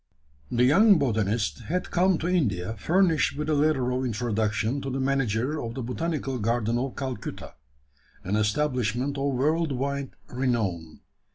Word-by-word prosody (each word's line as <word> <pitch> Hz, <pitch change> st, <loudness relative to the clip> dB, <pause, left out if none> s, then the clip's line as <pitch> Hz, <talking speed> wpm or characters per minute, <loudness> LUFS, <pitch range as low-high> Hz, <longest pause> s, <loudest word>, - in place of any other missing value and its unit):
The 120 Hz, 0 st, +2 dB
young 195 Hz, -, +6 dB
botanist 110 Hz, -5 st, 0 dB
had 180 Hz, +3 st, -2 dB
come 185 Hz, 0 st, +3 dB
to 165 Hz, -, -3 dB
India 110 Hz, -, 0 dB
furnished 160 Hz, -, +2 dB
with 150 Hz, +1 st, -2 dB
a -, -, +3 dB
letter 145 Hz, -4 st, +2 dB
of 130 Hz, +1 st, -1 dB
introduction 110 Hz, +1 st, -1 dB
to 135 Hz, -, -4 dB
the 135 Hz, +1 st, -2 dB
manager 135 Hz, +1 st, 0 dB
of 115 Hz, 0 st, -5 dB
the 130 Hz, -, -4 dB
Botanical 135 Hz, 0 st, -2 dB
Garden 115 Hz, +1 st, 0 dB
of 130 Hz, 0 st, -3 dB
Calcutta 130 Hz, -6 st, -5 dB, 0.7 s
an 95 Hz, +3 st, -1 dB
establishment 125 Hz, +3 st, 0 dB
of 140 Hz, 0 st, 0 dB
world 155 Hz, +4 st, +1 dB
wide 140 Hz, +1 st, -3 dB
renown. 105 Hz, -11 st, -2 dB
130 Hz, 150 wpm, -26 LUFS, 110-150 Hz, 0.7 s, young